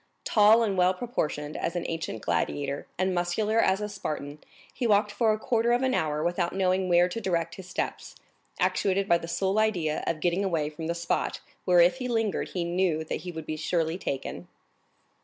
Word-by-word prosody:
Tall 215 +2 +5
and 195 -4 0
well 180 +1 +4
proportioned 155 -9 -3
as 170 - -2
an 175 - -2
ancient 160 -9 -4
gladiator, 140 -1 -1
and 185 +1 +1
muscular 195 +6 0
as 195 -2 +3
a 210 - -2
Spartan, 150 -7 -5 0.3
he 245 - -1
walked 210 0 +3
for 220 +1 +2
a 215 - +1
quarter 230 +1 +1
of 245 +2 +1
an 260 0 +2
hour 155 -4 0
without 175 +1 -1
knowing 185 -1 +1
where 175 0 +5
to 205 +6 -5
direct 170 -4 -1
his 185 0 -10
steps, - - -4 0.4
actuated 195 0 +1
by 170 -3 +4
the 165 - -7
sole 190 +4 0
idea 175 -8 0
of 160 - -1
getting 175 +4 +1
away 160 -6 0
from 160 +1 -6
the 170 - -1
spot 170 0 -1 0.3
where 180 -2 +6
if 175 +8 +4
he 250 -1 -3
lingered 225 -4 -1
he 180 - -2
knew 170 -2 0
that 155 - -4
he 180 - -6
would 160 -2 -7
surely 160 0 0
be - - -15
taken. 135 -1 -4
180 Hz, 200 wpm, -27 LUFS, 165-205 Hz, 0.4 s, where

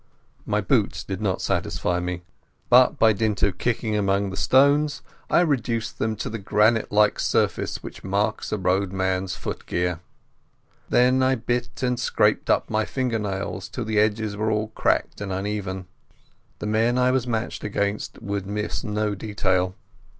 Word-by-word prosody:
My - - +1
boots - - +1
did - - -5
not - - -1
satisfy 90 0 -1
me, 90 0 -4 0.5
but 125 +4 +6
by 115 -4 +5
dint 105 0 -1
of 95 -3 +1
kicking 115 -2 0
among 100 -1 +1
the - - -5
stones 145 +6 +3 0.3
I - - +5
reduced 115 - -1
them 110 0 0
to - - -4
the 115 - -4
granite 105 +3 +2
like 105 0 +3
surface - - 0
which - - -9
marks 100 +2 -1
a 105 - 0
roadman's 95 0 0
footgear. 90 -1 -3 0.9
Then 125 +1 +4
I 130 0 +3
bit 120 +2 -3
and 125 -1 0
scraped - - +1 0.2
my 110 0 0
finger 125 -2 -1
nails 95 -3 -4
till 115 +5 -4
the 110 -1 +1
edges 105 0 +1
were 110 +1 -1
all 110 0 0
cracked 110 - 0
and 100 -1 -4
uneven. 95 -1 -3 0.7
The - - -6
men 115 +3 +2
I 125 0 +3
was 130 -1 0
matched 115 -1 -2
against 100 0 -2
would 100 -1 -3
miss 105 +4 -3
no 105 -2 -1
detail. 95 -3 0
105 Hz, 155 wpm, -24 LUFS, 95-115 Hz, 0.9 s, but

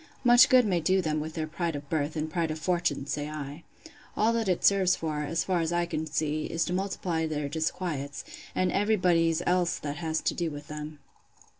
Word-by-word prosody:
Much 245 +1 +7
good 255 -3 +6
may 185 -4 +1
do 185 +4 +2
them 155 -4 0
with 155 +1 -5
their 160 -2 -1
pride 165 0 -3
of 145 0 -7
birth, 150 0 -1
and 155 0 -3
pride 165 0 0
of 155 - -3
fortune! 170 -4 0
say 145 +1 -3
I:—All 155 +8 -4
that 225 -4 0
it 180 - +1
serves 190 -2 +4
for, 155 -2 -3
as 165 +3 -1
far 185 -2 0
as 165 0 -1
I 175 0 +1
can 160 -2 -3
see, 155 0 -1
is, 165 - -1
to 180 - -3
multiply 180 -4 -1
their 150 -2 -2
disquiets, 155 -2 -3 0.3
and 185 -1 +1
every 205 +2 +2
body's 170 -3 +2
else 180 -1 +2
that 145 0 -5
has 160 -2 -1
to - - 0
do 170 -2 -2
with 145 -1 -9
them. 150 0 -6
165 Hz, 210 wpm, -28 LUFS, 150-180 Hz, 0.3 s, Much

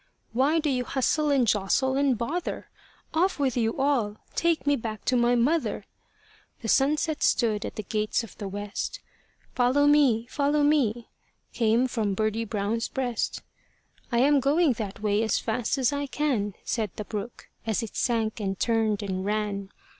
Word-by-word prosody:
"Why 275 +7 +3
do 315 -1 0
you 255 -3 +1
hustle 295 +4 0
and 275 -4 +3
jostle 220 +6 +1
and 275 -3 +2
bother? 300 +10 -4 0.4
Off 360 +4 +2
with 270 -4 0
you 225 -2 0
all! 250 -7 +1 0.2
Take 335 -3 +1
me 285 0 +3
back 220 -4 -6
to 255 - +2
my 240 0 +3
mother." 290 +8 +1 0.8
The - - -3
sunset 300 +4 +2
stood 215 -4 +2
at - - -6
the 215 - -4
gates 215 +3 -1
of 225 - -11
the 205 - -4
west. 205 - -4 0.5
"Follow 255 +3 +3
me, 280 -6 +4
follow 290 +3 +1
me" 245 -6 +1 0.4
came 235 +2 +2
from 215 -5 -1
Birdie 215 +2 0
Brown's 220 +1 -1
breast. 250 -4 -2 0.7
"I 235 - +1
am 285 +1 +5
going 285 +2 +3
that 210 -3 -6
way 210 0 +2
as 220 -2 +1
fast 225 +3 -1
as 265 +1 +2
I 285 0 -2
can," 245 -10 -1
Said 220 -3 -1
the 210 - -5
brook, 210 +3 -6 0.2
as 220 0 0
it 225 - -7
sank 225 -2 0
and 195 -2 -3
turned 220 -3 +1
and 190 -2 -3
ran. 205 -1 -2
235 Hz, 170 wpm, -26 LUFS, 215-280 Hz, 0.8 s, am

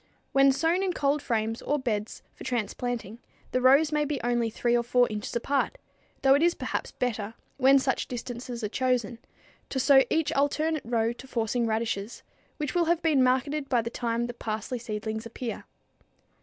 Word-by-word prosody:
When 275 0 +5
sown 325 +7 +1
in 380 -2 0
cold 285 -1 +1
frames 225 -2 -1
or 295 - 0
beds 225 -5 -3
for - - -11
transplanting, 235 -1 -3 0.3
the 255 - +1
rows 275 +4 +5
may 300 0 +2
be 295 -2 -2
only 240 -1 +1
3 240 +2 0
or 240 - +3
4 245 +1 +3
inches 210 +2 -5
apart, 280 - 0 0.5
though 270 0 +6
it 285 - +3
is 345 +1 +3
perhaps - - -3
better, 225 -3 -3 0.2
when 270 +1 +6
such 265 0 0
distances 245 -1 -6
are - - +1
chosen, 245 -2 0 0.5
to 265 - -2
sow 270 0 +6
each 320 -1 +1
alternate 305 +2 +1
row 230 0 0
to 260 +2 -12
forcing 235 -1 0
radishes, 220 -1 -2 0.3
which 300 -3 -3
will 345 -1 +2
have 340 0 +1
been 305 -5 +3
marketed 275 +3 +1
by 240 -3 +2
the 230 - -4
time 235 -1 -1
the 240 - -5
parsley 220 +2 -4
seedlings 220 0 -4
appear. 230 0 -6
250 Hz, 180 wpm, -27 LUFS, 230-280 Hz, 0.5 s, though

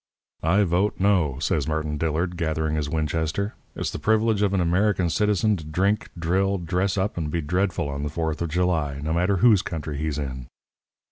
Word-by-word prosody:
"'I 95 +6 +3
vote 95 +3 +1
No,' 90 -9 +2
says 70 0 0
Martin 75 -1 -2
Dillard, 80 +3 -1
gathering 80 -2 -1
his 75 -2 -1
Winchester. 80 +6 -1 0.2
'It's - - -2
the - - -5
privilege 110 +3 +2
of 100 -2 +2
an 100 - +1
American 90 0 +2
citizen 105 +2 +2
to 80 - -8
drink, 95 +7 0
drill, 95 +4 +1
dress 90 +3 -1
up, 95 +1 -1
and 80 -3 -2
be 85 - -1
dreadful 90 0 0
on 70 0 -4
the 75 - -2
Fourth 80 0 -2
of 85 - -1
July, 80 -5 0
no 80 +1 -1
matter 90 +4 +2
whose 105 0 +5
country 75 -3 -5
he's 75 -2 -2
in.' 65 -4 -5
85 Hz, 190 wpm, -24 LUFS, 75-95 Hz, 0.2 s, whose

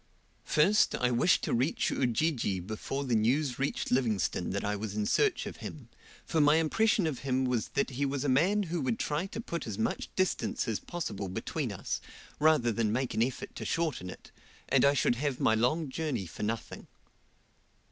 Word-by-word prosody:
First, 195 +8 +3
I 125 0 +1
wished 125 +9 +3
to - - -1
reach 130 +6 +1
Ujiji 125 - 0
before 110 +9 -4
the 130 -3 -1
news 125 +5 +1
reached 140 +1 -1
Livingstone 110 -8 +1
that 100 - -2
I 105 0 0
was 105 0 -5
in 105 -1 0
search - - +2
of - - -7
him, - - -8 0.4
for 160 - +1
my 150 +1 +6
impression 195 +5 +2
of 150 -6 -2
him 130 -1 0
was 125 -3 0
that 140 - +1
he 130 +3 -2
was 140 -1 -1
a - - 0
man 175 +11 +3
who 170 -2 -2
would 125 -4 0
try 155 +5 -1
to 210 - -7
put 170 - -4
as 105 -3 -4
much 110 - -2
distance 185 0 0
as 110 -3 -1
possible 105 - -4
between 95 - -3
us, - - -4 0.4
rather 150 -6 +4
than 110 -1 0
make 130 +3 -1
an - - 0
effort 125 +2 -2
to - - -5
shorten 160 - -1
it, - - -11 0.4
and 135 - +4
I 140 +1 +4
should 120 - +2
have 140 -1 -1
my 110 - +3
long 125 +8 +1
journey 135 - -2
for 80 - -9
nothing. 110 +2 -4
130 Hz, 195 wpm, -30 LUFS, 110-155 Hz, 0.4 s, my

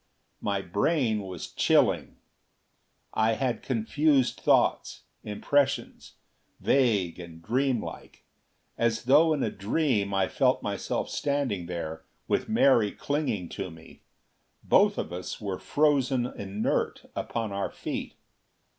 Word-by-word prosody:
My 100 -1 -1
brain 110 - +1
was 95 -3 -7
chilling. - - +2 1.0
I 110 +1 +2
had 120 -1 -1
confused 135 +3 +1
thoughts; - - +2 0.2
impressions, 140 +7 -1 0.5
vague 105 -11 +2
and 85 -2 -10
dreamlike. 125 +6 -2 0.5
As 115 -1 +1
though 150 +6 +5
in 150 -4 +1
a 110 - -1
dream 105 0 0
I 95 -1 +1
felt - - +1
myself - - -2
standing 135 -11 -1
there 80 -2 -5 0.2
with - - 0
Mary 130 - +4
clinging 145 - -2
to 95 -2 -5
me. 80 -1 -15 0.6
Both - - +4
of 85 - -4
us 90 0 -5
were 100 -3 -4
frozen 140 -4 +2
inert 100 -3 -2
upon 115 -3 -3
our 100 0 -2
feet. - - -5
110 Hz, 115 wpm, -27 LUFS, 95-135 Hz, 1.0 s, though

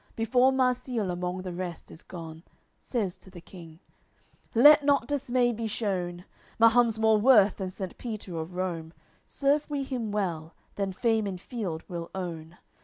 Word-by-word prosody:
Before 245 +3 +3
Marsile 250 -5 0
among 180 +1 -3
the 180 -1 -5
rest 175 -2 -6
is 160 - -12
gone, 165 -2 -9 0.4
Says 205 -8 -3
to - - -16
the 180 -2 -11
King: 170 -2 -13 0.8
"Let 295 +5 +8
not 280 -4 +2
dismay 255 -4 +1
be 225 0 -3
shewn! 180 -5 -3 0.3
Mahum's 230 0 +4
more 220 -1 +4
worth 210 -4 +5
than 190 -2 -3
Saint 190 0 -7
Peter 215 -7 -6
of 165 +3 -6
Rome; 170 -3 -3 0.3
Serve 285 +2 0
we 285 -2 -2
him 245 -5 -4
well, 170 -6 -3 0.2
then 195 -1 -2
fame 220 +1 0
in 190 -2 -4
field 180 -6 -5
we'll 170 -2 -6
own. 170 -2 -6
200 Hz, 160 wpm, -28 LUFS, 175-240 Hz, 0.8 s, Let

